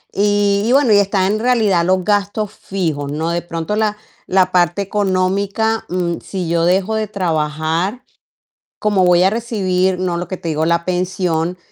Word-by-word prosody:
Y 205 0 +2
y - - +2
bueno 270 -5 +4
y, 205 - +6
está 195 -1 +1
en 210 +3 0
realidad 220 -7 +2
los 185 +1 +1
gastos 205 0 0
fijos, 155 -7 -3
¿no? 160 +3 -2
De 170 0 -1
pronto 170 +3 -4
la 215 -1 0 0.3
la 185 -1 +2
parte 175 +2 +2
económica, 200 +2 0
mm, 175 -1 -2
si 185 -3 -4
yo 165 0 +1
dejo 190 +4 +1
de 220 0 -1
trabajar, 165 +2 -1 0.8
como 205 -3 +2
voy 175 0 +4
a 190 - +5
recibir, 190 -5 0
¿no?, 180 -2 -1
lo 175 - -4
que 185 - -5
te 170 - -8
digo, 155 0 0
la 170 0 +1
pensión, 180 -2 -1
185 Hz, 175 wpm, -17 LUFS, 175-205 Hz, 0.8 s, y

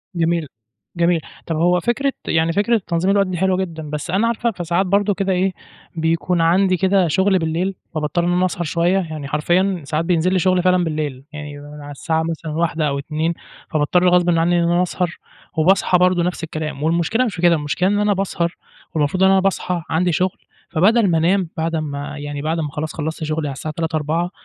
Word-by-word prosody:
جميل، 165 -2 0 0.5
جميل، 170 -1 +2 0.3
طَب 165 - -1
هو 175 +2 +3
فكرة 265 +7 0
يعني 165 +1 +2
فكرة 210 +3 +2
تنظيم 175 +2 +1
الوقت 200 -1 +3
دي 180 -2 -3
حلوة 190 +1 +2
جدًا، 165 -5 -4
بس 150 +3 -5
أنا 205 +5 +2
عارفة 235 0 0
فساعات 175 0 -1
برضه 200 +2 +2
كده 195 0 -1
إيه 185 +1 +1 0.4
بيكون 165 +2 0
عندي 185 +3 +3
كده 190 0 +3
شُّغل 190 +4 +2
بالليل، 170 +4 -1 0.2
فباضطر 155 +3 0
إن 175 - +1
أنا 180 +1 +2
أسهر 175 -1 -2
شوية، 170 +3 +1
يعني 155 -5 -5
حرفيًا 175 +5 +1
ساعات 155 +2 -1
بينزِل 180 +1 +2
لي 185 - +3
شُغل 185 0 +2
فعلًا 180 -1 +3
بالليل، 150 -5 -3
يعني 150 -1 -7
على 145 0 -10
الساعة 160 +3 -1
مثلًا 160 -1 -4
01:00 160 -1 0
أو 140 0 -1
02:00 155 +3 -2 0.4
فباضطر 175 +4 +2
غصبٍ 175 0 +3
عنّي 170 +1 +3
إن 170 - +1
أنا 175 +1 +3
أسهر، 180 -1 -2 0.4
وباصحى 180 +2 +4
برضه 180 -1 +3
نفس 175 -2 -2
الكلام، 155 -2 -4
والمشكلة 170 +9 +1
مش 210 -7 -3
في 170 - -6
كده، 175 -1 +5
المشكلة 150 +5 0
إن 205 0 +1
أنا 210 0 +2
باسهر، 180 -3 -2 0.4
والمفروض 155 +5 +1
إن 190 - +6
أنا 195 - +5
باصحى 185 -2 -1
عندي 175 +2 +1
شُغل، 180 +4 0 0.3
فبدل 200 +6 +3
ما 165 - +3
أنام 175 +1 +2
بعد 165 +1 -1
أمّا 145 -1 -4
يعني 145 0 -5
بعد 160 +2 -1
أمّا 150 -2 -2
خلاص 155 +1 -4
خلصت 160 +1 -4
شُغلي 155 -1 -2
على 140 - -3
الساعة 155 +3 -6
03:00 165 -1 -1
04:00 160 +4 -1
170 Hz, 205 wpm, -20 LUFS, 155-185 Hz, 0.5 s, إن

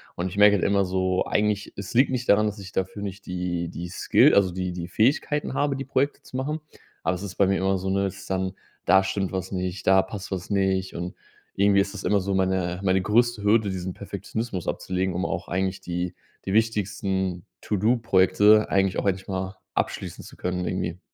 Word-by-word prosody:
Und 90 +2 -2
ich 95 - -9
merke 105 0 +7
halt 95 - 0
immer 100 -1 +3
so, 95 0 0
eigentlich 105 -1 0
es 100 -1 -7
liegt 130 +4 +4
nicht 125 -1 -2
daran, 105 +1 +5
dass 105 0 -3
ich 95 -1 -9
dafür 95 +2 -3
nicht 100 0 -6
die 90 -2 -3
die 85 +1 -6
Skill - - +4
also 100 -2 +4
die 90 0 -3
die 85 -1 -5
Fähigkeiten 135 - +1
habe, 145 -1 +1
die 135 0 -5
Projekte 135 +2 0
zu 130 - -8
machen, 150 +4 -2 0.4
aber 90 - +1
es 90 - -7
ist 95 -3 -6
bei 100 - +3
mir 95 0 +2
immer 95 0 +1
so 95 +1 -3
'ne 100 +1 +1
ist 95 0 -9
dann, 95 -1 -1 0.3
da 95 - +5
stimmt 95 0 -2
was 95 0 -3
nicht, 90 0 -3
da 95 0 +6
passt 95 +1 -7
was 90 -2 -4
nicht 95 -2 0
und 90 +1 -4 0.4
irgendwie 100 0 +4
ist 100 - -3
das 105 - -7
immer 100 -1 +3
so 100 +1 -2
meine 95 -2 0
meine 95 -1 +2
größte 110 +2 +2
Hürde, 105 0 +3
diesen 95 -1 -4
Perfektionismus 110 -3 -5
abzulegen, 95 0 -1
um 90 +3 -1
auch 95 - -3
eigentlich 95 +1 -1
die 90 0 -3 0.3
die 95 - -2
wichtigsten 100 -4 0 0.2
To-Do-Projekte 105 -1 +4
eigentlich 95 -1 +2
auch - - -3
endlich 95 -1 -1
mal 95 -1 -4 0.2
abschließen - - -3
zu - - -13
können 90 0 -2
irgendwie. 90 -1 -3
95 Hz, 205 wpm, -25 LUFS, 95-105 Hz, 0.4 s, merke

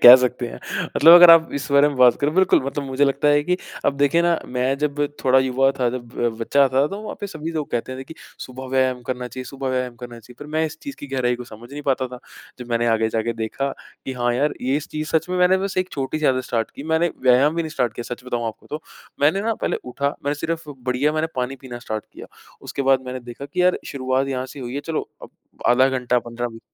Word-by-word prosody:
कह 120 - +13
सकते 125 -1 -1
हैं। - - -9 0.4
मतलब 165 +2 +8
अगर 175 -1 +10
आप 165 -1 +7
इस 140 - -4
बारे 140 +1 +6
में 145 - -5
बात 125 -1 +6
करो, 145 +1 +2
बिल्कुल 190 +3 +4
मतलब 140 +1 -3
मुझे 135 +1 +1
लगता 140 +1 +1
है 145 0 +4
कि 180 +3 +1 0.3
अब 140 - +1
देखिए 145 +4 +3
ना, 170 -1 +2
मैं 125 +2 0
जब 145 0 -1 0.2
थोड़ा 130 0 +5
युवा 130 +1 +2
था, 125 -2 +2
जब 120 -1 -6
ब 120 -1 +1
बच्चा 140 +4 +3
था, 135 +3 +2
तो 200 +6 -6
वहाँ 215 - -6
पर 205 - -3
सभी 160 -4 -6
लोग 155 -3 -3
कहते 120 +2 -3
थे 135 - -7
कि 160 - -11 0.3
सुबह 130 +1 -9
व्यायाम 130 -1 +1
करना 125 0 -4
चाहिए 130 +1 -7
सुबह 135 0 -5
व्यायाम 125 -1 -2
करना 120 -1 -9
चाहिए, 125 +2 -16
पर 145 - -8
मैं 160 +1 +1
इस 160 +1 -9
चीज़ 280 -1 -7
की 145 - -9
गहराई 130 -2 0
को 125 - -8
समझ 120 +1 -13
नहीं 145 +1 -6
पाता 130 -2 0
था। 125 0 -9 0.4
जब 125 -1 -9
मैंने 120 0 +1
आगे 110 -1 +2
जाके 115 +1 -1
देखा 115 +5 -3 0.4
कि 135 - -4
हाँ 120 -1 0
यार, 145 +4 +1
ये 130 +3 +1
इस 150 - -5
चीज़ 155 0 -4
सच 160 +2 -1
में 180 - -1
मैंने 180 +1 +5
बस 195 0 -3
एक 185 0 -1
छोटी-सी 145 +2 -2
आदत 130 -1 +2
स्टार्ट 115 -2 -2
की। - - -8
मैंने 170 +2 +3
व्यायाम 130 +5 +4
ही 170 - +1
नहीं 160 - -5
स्टार्ट 125 -6 -1
किया, 120 +1 -5
सच 125 - -20
बताऊँ 120 -2 -2
आपको 110 0 -7
तो। 150 +1 -5 0.4
मैंने 155 +7 +3
ना 225 0 0
पहले - - -2
उठा, 140 +3 -2
मैं 145 - 0
सिर्फ़ 160 +1 -4
बढ़िया 130 +2 -1
मैंने 155 +1 0
पानी 130 +2 -2
पीना 125 -3 -8
स्टार्ट 110 -2 -5
किया। - - -10 0.4
उसके 140 - -4
बाद 135 -1 +4
मैंने 130 0 -5
देखा 120 +3 -9
कि 180 +4 -1
यार, 180 0 +3
शुरुआत 130 0 -1
यहाँ 130 -1 -2
से 140 +1 -10
हुई 125 +1 -6
है, 140 - -2
चलो 160 +1 -4
अब - - -9 0.4
आधा 130 +2 +5
घंटा 125 -2 +1
15 120 0 -5
मिनट 115 0 -12
135 Hz, 260 wpm, -22 LUFS, 125-150 Hz, 0.4 s, कह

